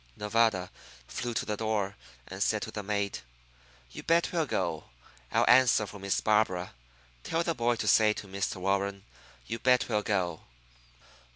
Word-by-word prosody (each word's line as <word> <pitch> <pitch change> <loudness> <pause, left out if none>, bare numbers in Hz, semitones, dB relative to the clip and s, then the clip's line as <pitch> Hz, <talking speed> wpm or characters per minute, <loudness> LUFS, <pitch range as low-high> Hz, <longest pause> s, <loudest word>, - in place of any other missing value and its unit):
Nevada 105 -3 +1 0.4
flew 120 - -4
to - - -1
the 105 - -2
door, 105 -2 -1 0.3
and - - -8
said - - +1
to - - -6
the 105 - -4
maid: 100 0 -2 0.7
"You - - -8
bet 170 +1 +2
we'll 165 -4 0
go. 85 -4 -2 0.5
I'll - - +3
answer 125 -4 +5
for 100 0 -10
Miss 100 0 -1
Barbara. 105 -4 +1 0.5
Tell 165 +1 0
the 170 - 0
boy 120 -2 +1
to 110 - -3
say 105 +1 +5
to 105 - -8
Mr. 100 0 -3
Warren, 100 +1 -1 0.4
'You 115 - -4
bet 125 +1 +3
we'll 105 -3 +1
go.'" 90 -6 -1
105 Hz, 165 wpm, -29 LUFS, 100-115 Hz, 0.7 s, answer